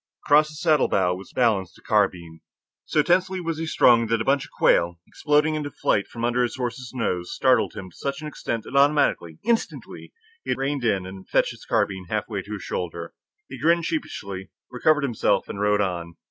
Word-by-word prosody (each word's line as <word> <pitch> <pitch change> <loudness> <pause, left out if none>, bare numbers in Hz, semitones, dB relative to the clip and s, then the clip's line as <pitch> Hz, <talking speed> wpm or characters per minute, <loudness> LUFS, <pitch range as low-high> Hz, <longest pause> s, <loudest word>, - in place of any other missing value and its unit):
Across 150 +1 +5
his 150 0 -10
saddle 155 -4 +3
bow 90 -2 +2
was 95 +2 -9
balanced 105 -8 +1
a - - -19
carbine. 90 -6 0 0.5
So 150 - +2
tensely 185 +3 +2
was 165 -2 -3
he 165 - -3
strung, 115 -6 +4
that 115 0 +1
a - - 0
bunch 140 +1 +2
of - - -16
quail, 85 0 +2
exploding 150 +1 +1
into 150 -1 -3
flight 100 -7 0
from 115 0 -4
under 120 +1 +1
his 120 - -1
horse's 125 0 -4
nose, 90 -8 -2
startled - - +2
him 95 -1 -8
to - - -21
such 140 0 -4
an 155 - -7
extent 115 -6 -4
that - - -9
automatically, 140 - +2
instantly, 235 -1 -2 0.3
he - - -9
had - - +1
reined 135 0 -2
in 100 -5 +1
and 95 0 -10
fetched - - +2
the - - -13
carbine 95 -2 0
halfway 105 -1 -2
to 105 +3 -8
his 100 - -6
shoulder. 85 -1 -5 0.3
He - - -9
grinned 170 +1 +3
sheepishly, 100 - -4 0.2
recovered 150 +4 +2
himself, 120 -6 +1
and 100 - -6
rode 105 0 +3
on. 85 -3 -3
120 Hz, 200 wpm, -24 LUFS, 95-150 Hz, 0.5 s, Across